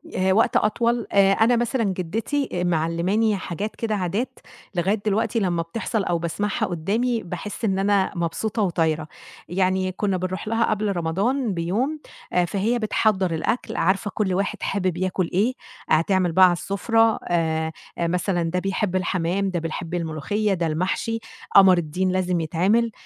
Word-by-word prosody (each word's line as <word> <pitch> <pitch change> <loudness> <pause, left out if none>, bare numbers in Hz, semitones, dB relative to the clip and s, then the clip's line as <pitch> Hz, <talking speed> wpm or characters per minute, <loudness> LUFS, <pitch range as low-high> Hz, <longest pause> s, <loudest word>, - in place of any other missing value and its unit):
آآ 190 +1 +2
وقت 225 +3 +3
أطول، 235 +2 +1
آآ 195 -1 +5
أنا 230 +3 +4
مثلًا 240 0 0
جِدّتي 215 - -2
آآ 180 - -1
معلِّماني 175 +6 +1
حاجات 195 +4 -5
كده 220 -2 -2
عادات 200 +6 -2 0.4
لغاية 195 +5 +1
دلوقتي 220 +2 +1
لمّا 175 -4 0
بتحصل 205 +4 -2
أو 175 -2 0
باسمعها 170 +5 -1
قُدّامي، 215 +8 -1
باحِس 205 +5 -5
إن 190 -2 +1
أنا 200 -1 +2
مبسوطة 205 +6 -2
وطايرة. 160 -4 0 0.4
يعني 185 +1 +1
كُنّا 190 0 -1
بنروح 185 +3 -4
لها 225 +1 +2
قبل 210 -2 0
رمضان 200 +8 0
بيوم، 215 - -1 0.3
آآ 180 -1 +3
فهي 210 +7 0
بتحضّر 210 -5 +1
الأكل، 190 +9 -2
عارفة 195 +4 +1
كل 195 -4 0
واحد 200 +2 -1
حابب 185 -3 -1
ياكُل 185 -1 -1
إيه، 215 +8 +2 0.4
هتعمل 175 +2 +2
بقى 185 +3 +7
على 180 - +4
السُفرة، 225 +5 +1
آآ 160 -2 0 0.3
آآ 170 - 0
مثلًا 175 0 0
ده 175 +2 -1
بيحب 195 0 -1
الحمام، 185 +1 0
ده 180 -2 -1
بيحب 165 +1 -5
الملوخيّة، 175 +6 -1
ده 175 -3 0
المحشي، 185 +8 -1 0.4
قمر 190 -2 +8
الدين 175 +3 -1
لازم 180 -2 0
يتعمل. 195 +9 +1
190 Hz, 155 wpm, -23 LUFS, 175-215 Hz, 0.4 s, قمر